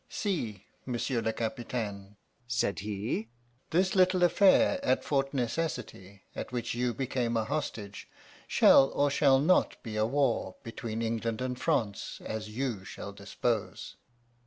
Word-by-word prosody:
"'See, 115 Hz, -, -3 dB, 0.2 s
monsieur 125 Hz, -1 st, -1 dB
le 110 Hz, -, 0 dB
capitaine,' 110 Hz, -4 st, -4 dB, 0.3 s
said 120 Hz, -4 st, 0 dB
he, 105 Hz, +2 st, -3 dB, 0.4 s
'this 185 Hz, +3 st, +2 dB
little 185 Hz, -1 st, +4 dB
affair 205 Hz, +10 st, +4 dB
at -, -, +2 dB
Fort 135 Hz, -1 st, 0 dB
Necessity, 120 Hz, -, -3 dB
at -, -, -5 dB
which 120 Hz, -2 st, -2 dB
you 120 Hz, +1 st, 0 dB
became 125 Hz, -2 st, -1 dB
a 110 Hz, -, 0 dB
hostage, 105 Hz, -7 st, -4 dB, 0.4 s
shall 135 Hz, -, +6 dB
or 145 Hz, 0 st, +2 dB
shall 140 Hz, -1 st, +5 dB
not 160 Hz, +7 st, +3 dB
be 110 Hz, -3 st, -6 dB
a 110 Hz, -, +3 dB
war 135 Hz, -2 st, 0 dB
between 115 Hz, 0 st, -4 dB
England 115 Hz, 0 st, -2 dB
and 125 Hz, 0 st, -3 dB
France 100 Hz, -3 st, -1 dB
as 110 Hz, -1 st, -4 dB
you 115 Hz, -3 st, -3 dB
shall 100 Hz, +1 st, -8 dB
dispose. 105 Hz, +2 st, -3 dB
120 Hz, 135 wpm, -30 LUFS, 110-135 Hz, 0.4 s, shall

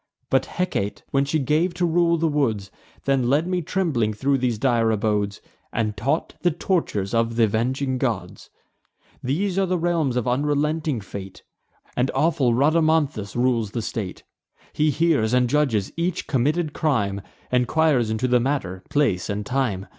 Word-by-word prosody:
But -, -, +2 dB
Hecate, 105 Hz, -, -2 dB
when 140 Hz, 0 st, +2 dB
she 145 Hz, +3 st, 0 dB
gave 155 Hz, +5 st, +1 dB
to 180 Hz, 0 st, +1 dB
rule 170 Hz, 0 st, +3 dB
the 165 Hz, 0 st, +1 dB
woods, 115 Hz, -10 st, 0 dB, 0.3 s
Then 135 Hz, -3 st, +2 dB
led 145 Hz, +5 st, +3 dB
me 180 Hz, 0 st, -1 dB
trembling 150 Hz, -, 0 dB
thro' 135 Hz, +5 st, +1 dB
these 125 Hz, -4 st, 0 dB
dire 115 Hz, -1 st, +2 dB
abodes, 105 Hz, -2 st, 0 dB, 0.3 s
And 110 Hz, -2 st, -1 dB
taught 135 Hz, -, -1 dB
the 175 Hz, -, +3 dB
tortures 155 Hz, -, -1 dB
of 115 Hz, 0 st, +1 dB
th' 120 Hz, -, +1 dB
avenging 130 Hz, +5 st, +1 dB
gods. 105 Hz, -9 st, -3 dB, 0.7 s
These 180 Hz, +9 st, 0 dB
are 195 Hz, -, +2 dB
the 180 Hz, 0 st, +1 dB
realms 165 Hz, -6 st, 0 dB
of 125 Hz, -1 st, -1 dB
unrelenting 145 Hz, +1 st, 0 dB
fate; 95 Hz, -1 st, -9 dB, 0.5 s
And 125 Hz, +1 st, +1 dB
awful 135 Hz, -4 st, +2 dB
Rhadamanthus 155 Hz, -6 st, +2 dB
rules 120 Hz, -3 st, +1 dB
the 115 Hz, -, -2 dB
state. 105 Hz, -4 st, -5 dB, 0.5 s
He 155 Hz, +1 st, +2 dB
hears 145 Hz, -6 st, +2 dB
and 125 Hz, -1 st, +3 dB
judges 120 Hz, -8 st, +1 dB
each 175 Hz, +1 st, -1 dB
committed 150 Hz, +3 st, 0 dB
crime; 105 Hz, -10 st, 0 dB, 0.3 s
Enquires 125 Hz, -1 st, +2 dB
into 110 Hz, +3 st, 0 dB
the 125 Hz, 0 st, +4 dB
manner, 120 Hz, -9 st, -2 dB
place, 110 Hz, -12 st, +1 dB
and 105 Hz, 0 st, -3 dB
time. 125 Hz, -7 st, -1 dB
130 Hz, 155 wpm, -23 LUFS, 110-155 Hz, 0.7 s, the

